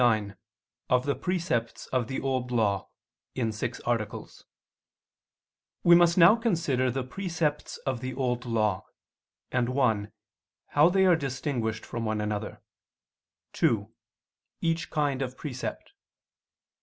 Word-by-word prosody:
________________________ - - +6
QUESTION 110 -4 +3
99 - - -32 0.5
OF 125 0 +3
THE 140 - +2
PRECEPTS 170 -11 -2
OF 125 -3 +1
THE 130 - -3
OLD 130 -2 -1
LAW 105 -6 0 0.5
(In 115 -3 0
Six 110 - -4
Articles) 115 -3 -3 1.4
We 175 - +7
must 170 0 +6
now 175 +4 +8
consider 165 - +1
the 130 +2 -2
precepts 165 +1 -2
of 130 -3 -1
the 130 +1 -5
Old 125 -2 -1
Law; 110 -2 +1 0.7
and 125 -1 +1
(1) 110 -6 +1 0.6
how 150 +4 +5
they 190 +1 +3
are 180 -2 +6
distinguished 130 -6 -2
from 115 - -4
one 110 -1 -1
another; 105 0 -3 0.9
(2) - - +1 0.7
each 165 0 -1
kind 145 -3 0
of 130 -1 -4
precept. 130 -5 -5
130 Hz, 130 wpm, -28 LUFS, 115-150 Hz, 1.4 s, now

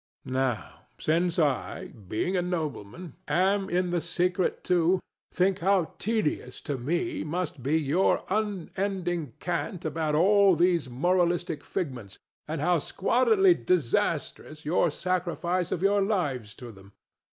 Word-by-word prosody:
Now, 130 -3 -2
since 170 +2 +1
I, 150 -5 0
being 110 - -3
a 180 - +2
nobleman, 165 - -4
am 195 +2 +2
in 180 0 0
the 175 -1 0
secret 180 +2 0
too, 180 +1 +3 0.3
think 185 +1 +1
how 185 -1 +2
tedious 195 - -1
to 145 - -3
me 175 - -1
must 160 -3 -3
be 145 +6 +1
your 160 +5 +2
unending 190 - -2
cant 175 +1 -3
about 155 -1 -1
all 195 +3 +5
these 170 -5 +2
moralistic 175 +2 0
figments, 125 - -5 0.3
and 155 -1 -3
how 175 +1 +3
squalidly 350 - +3
disastrous 155 - -1
your 170 +2 +2
sacrifice 180 +1 -1
of 180 - -2
your 200 +1 +3
lives 145 - -1
to 120 -2 -9
them! 100 -1 -16
175 Hz, 130 wpm, -27 LUFS, 150-185 Hz, 0.3 s, all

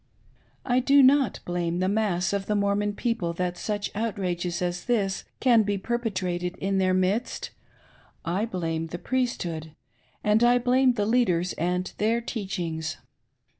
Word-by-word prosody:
I 250 0 +3
do 275 +2 +5
not 265 -3 +4
blame 175 -1 -1
the 185 +1 +1
mass 195 -3 0
of 200 -1 -2
the 210 - +1
Mormon 205 0 +1
people 195 -9 -1
that 180 +1 -2
such 205 +2 -3
outrages 185 -5 -2
as 180 -1 -2
this 200 -6 0
can 240 -3 +5
be 205 -1 0
perpetrated 185 -5 -2
in 195 0 0
their 185 -1 +2
midst, 190 +6 -1 0.4
— - - -31
I 220 - 0
blam^ 165 -5 -3
the 175 - -5
Priesthood, 170 -10 -2 0.5
and 210 +2 +3
I 240 +1 +5
blame 250 +1 +3
the 210 -3 -1
leaders 185 -7 +2
and 180 +2 -2
their 225 +3 +2
teachings. 180 -9 -4
200 Hz, 150 wpm, -26 LUFS, 175-230 Hz, 0.5 s, do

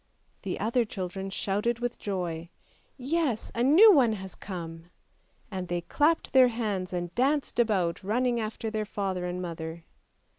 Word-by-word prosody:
The 190 -3 -4
other 235 +4 +2
children 190 -2 -5
shouted 205 +4 -1
with 240 0 -3
joy, 175 -4 -3 0.3
" - - -36
Yes, 275 -3 -1
a 235 - -2
new 330 - +8
one 250 -8 +4
has 190 -3 -6
come! 165 -3 -7 0.3
" - - -39
And 185 -2 -4
they 175 0 -2
clapped 305 - +1
their 260 -1 +8
hands 210 -6 -2
and 175 -1 -3
danced 275 +1 +1
about, 190 -8 +1
running 240 +4 +1
after 220 0 -4
their 215 -1 -2
father 190 -3 -3
and 180 +1 -3
mother. 165 -1 -6
205 Hz, 160 wpm, -28 LUFS, 180-240 Hz, 0.3 s, new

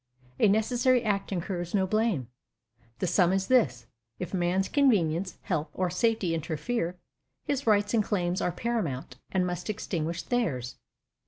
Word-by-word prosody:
A - - +6
necessary 240 +4 +3
act 200 -2 -1
incurs 175 -1 -3
no 190 -2 +3
blame. 215 - 0 0.7
The - - -1
sum 180 0 +3
is 190 0 +1
this: 135 - +2 0.3
if 180 0 -5
man's 185 +1 +1
convenience, 190 - +2
health, 155 -4 -1
Or 185 -1 0
safety 210 -3 +1
interfere, 165 +4 -2 0.5
his 280 -3 -2
rights 205 0 +3
and 220 -2 +3
claims 180 -3 -1
Are 180 - +1
paramount, 170 - -3
and 185 -1 +2
must 180 +3 -4
extinguish 170 -5 -2
theirs. 145 - -1
185 Hz, 145 wpm, -28 LUFS, 170-220 Hz, 0.7 s, A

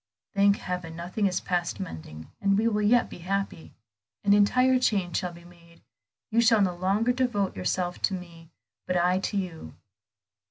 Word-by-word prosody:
"Thank 200 0 +4
heaven, 180 -3 -5
nothing 180 +5 -1
is 185 -1 -1
past 175 0 -2
mending, 80 - -8
and 200 0 +3
we 220 +2 +2
will 210 -2 +1
yet 230 +4 +4
be - - -11
happy. 195 -1 -3 0.5
An 200 -1 +4
entire 255 +5 +4
change 195 -8 +1
shall 180 -2 -2
be 170 0 -14
made; 170 -1 -19 0.5
you 230 +1 +4
shall 225 -1 +5
no 185 -2 +1
longer 195 +7 +1
devote 240 -7 0
yourself 175 - -2
to 195 - -4
me, 170 -3 -11 0.4
but 180 - +1
I 180 +1 +2
to 200 - -2
you. 180 -5 -5
185 Hz, 170 wpm, -27 LUFS, 175-205 Hz, 0.5 s, shall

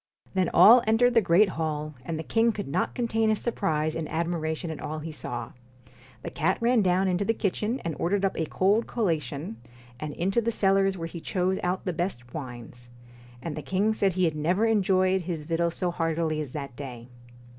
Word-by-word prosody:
Then 185 -2 +1
all 220 +9 +8
entered 240 +3 +4
the 230 - +5
great 185 +2 +4
hall, 155 -2 -3
and 160 +4 -4
the 160 - -4
king 225 +6 +2
could 205 -2 -5
not 135 - -1
contain 225 -2 +1
his 215 -1 +1
surprise 155 -9 -1
and 160 -2 -4
admiration 165 -1 -2
at 155 - -7
all 155 +1 -4
he 155 +1 -6
saw. 125 -5 -5 0.7
The - - -5
cat 170 +3 0
ran 235 0 +3
down 185 0 +2
into 180 +1 +1
the 225 +3 0
kitchen 215 +6 -1
and 165 -2 -3
ordered 195 +3 +1
up 195 - -1
a 160 - -2
cold 205 +5 +2
collation, 155 - -2 0.4
and 150 +1 -5
into 195 +7 +1
the 230 - -1
cellars, 195 -3 +2
where 165 -1 -4
he 165 0 -8
chose 185 +2 0
out 180 +1 -2
the 180 - -1
best 155 -9 -4
wines; 120 -3 -8 0.5
and 160 -3 -4
the 155 - -5
king 200 +7 +1
said 200 -3 +1
he 185 0 +2
had 160 -2 0
never 175 +8 +1
enjoyed 190 -3 +2
his 165 -3 -4
victuals 170 +1 0
so 180 -1 -1
heartily 165 -2 -1
as 140 -4 -7
that 140 -4 -6
day. 125 -4 -8
175 Hz, 200 wpm, -27 LUFS, 155-200 Hz, 0.7 s, all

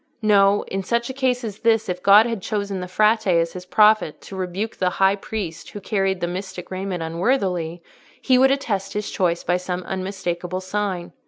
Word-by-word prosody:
No: 200 -1 +4
in 195 - -4
such 235 +5 -1
a - - -8
case 255 -2 0
as 215 -2 -6
this, 225 -1 +2
if 180 -1 -3
God 205 +4 +7
had 230 -4 -3
chosen 200 -1 -3
the 180 - -5
Frate 215 +4 +2
as 170 -2 +2
his 180 0 -9
prophet 210 -5 +3
to 195 - -10
rebuke 190 +4 -4
the 185 - +1
High 195 0 +4
Priest 195 -5 -6
who 205 - -8
carried 195 -2 -1
the 175 - 0
mystic 180 0 -6
raiment 185 -2 -3
unworthily, 175 -2 -1 0.4
he 255 -1 +3
would 265 +1 +6
attest 210 -8 -1
his 210 0 -3
choice 175 -2 0
by 175 +1 +1
some 180 0 -4
unmistakable 185 -1 -4
sign. 185 -2 -3
195 Hz, 190 wpm, -22 LUFS, 180-215 Hz, 0.4 s, God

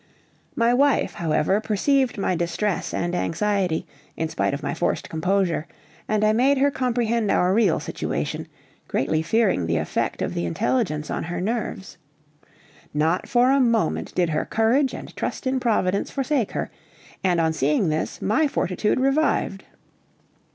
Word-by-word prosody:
My 235 +1 +3
wife, 280 +2 +2
however, 170 +4 +1
perceived 250 +4 +1
my 190 -2 0
distress 175 +4 -1
and 175 0 -2
anxiety, 185 -1 0 0.3
in 160 0 -1
spite - - 0
of 140 +1 -4
my - - -2
forced 170 - -1
composure, 175 0 0 0.4
and 215 0 +1
I 215 0 +4
made 265 +5 +3
her 280 +2 +3
comprehend 235 -4 0
our 180 -1 +3
real 205 -5 +3
situation, - - -3 0.4
greatly 155 +4 0
fearing 185 - +1
the 85 0 +1
effect 80 0 -2
of - - -2
the 85 - -2
intelligence 155 - -1
on - - -2
her 175 +1 -4
nerves. 210 -1 -3 1.0
Not 160 +4 +1
for 245 +1 +4
a 275 - +4
moment 230 -4 +1
did 175 -2 +2
her 155 -1 0
courage 245 +5 +1
and - - -9
trust - - -4
in 260 0 +1
Providence 200 -5 +1
forsake 270 -4 -1
her, - - -3 0.5
and 180 -2 +2
on 160 -1 +2
seeing 150 +4 +1
this, 155 +1 -3
my 225 +10 +2
fortitude 210 -3 0
revived. 270 -7 +1
200 Hz, 150 wpm, -23 LUFS, 165-240 Hz, 1.0 s, I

